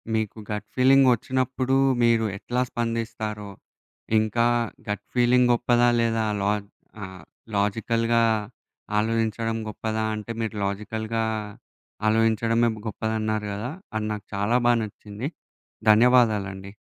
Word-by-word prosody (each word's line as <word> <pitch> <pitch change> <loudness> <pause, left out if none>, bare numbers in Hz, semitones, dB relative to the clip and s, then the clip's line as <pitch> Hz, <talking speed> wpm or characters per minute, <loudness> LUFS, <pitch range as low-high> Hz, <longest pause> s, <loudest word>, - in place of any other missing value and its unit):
మీకు 110 0 -2
గట్ 105 0 -4
ఫీలింగొచ్చినప్పుడు 130 0 +3 0.3
మీరు 115 -1 +3
ఎట్లా 125 +4 -2
స్పందిస్తారో! 115 -3 -3 0.7
ఇంకా 110 +2 +1 0.4
గట్ 105 - -2
ఫీలింగ్ 125 0 +4
గొప్పదా? 120 0 +3
లేదా? 115 -1 +1 0.2
లా 100 +1 +2 0.5
ఆహ్, 95 -3 -9 0.3
లాజికల్‌గా 115 +3 +1 0.8
ఆలోచించడం 115 0 0
గొప్పదా? 110 +1 -2
అంటే 105 +2 -6
మీరు 110 -1 -3
లాజికల్‌గా 110 +3 -2 0.9
ఆలోచించడమే 115 +1 +2 0.2
గొప్పదన్నారు 110 -1 -2
కదా! 110 +7 -4 0.2
అది 110 0 -1
నాకు 105 -2 -7
చాలా 105 +5 +2
బా 120 - +6
నచ్చింది. 105 +4 -6 0.6
ధన్యవాదాలండి. 105 -5 +3
115 Hz, 100 wpm, -25 LUFS, 105-120 Hz, 0.9 s, బా